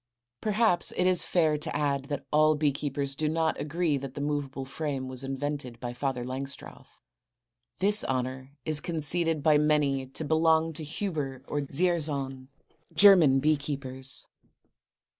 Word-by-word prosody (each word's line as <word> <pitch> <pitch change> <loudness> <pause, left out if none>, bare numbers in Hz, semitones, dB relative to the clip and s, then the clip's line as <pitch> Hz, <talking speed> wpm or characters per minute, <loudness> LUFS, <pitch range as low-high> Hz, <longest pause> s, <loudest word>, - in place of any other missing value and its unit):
Perhaps 215 -4 +3
it 180 - +2
is 185 -1 +4
fair 155 -4 +1
to 150 - -4
add 140 -2 0
that 145 -1 -5
all 155 +1 +4
bee 150 -1 +2
keepers 140 0 -2
do 150 +2 -1
not 160 0 0
agree 155 0 0
that 135 -1 -7
the - - -5
movable 145 -2 -3
frame 135 -1 -4
was 130 0 -5
invented 135 -2 -4
by 120 -1 -5
Father 125 -1 -2
Langstroth. 135 +2 -8 0.7
This 205 +2 +4
honor 130 0 -3 0.2
is 155 -1 +1
conceded 165 -1 +1
by 155 -2 +5
many 145 -3 +1
to 135 +4 -5
belong 160 +1 +2
to 155 - -5
Huber 150 -5 -4
or 145 - -2
Dzierzon, 140 -4 -1 0.5
German 170 -8 +7
bee 155 +2 +3
keepers. 135 -2 -5
145 Hz, 145 wpm, -28 LUFS, 135-160 Hz, 0.7 s, German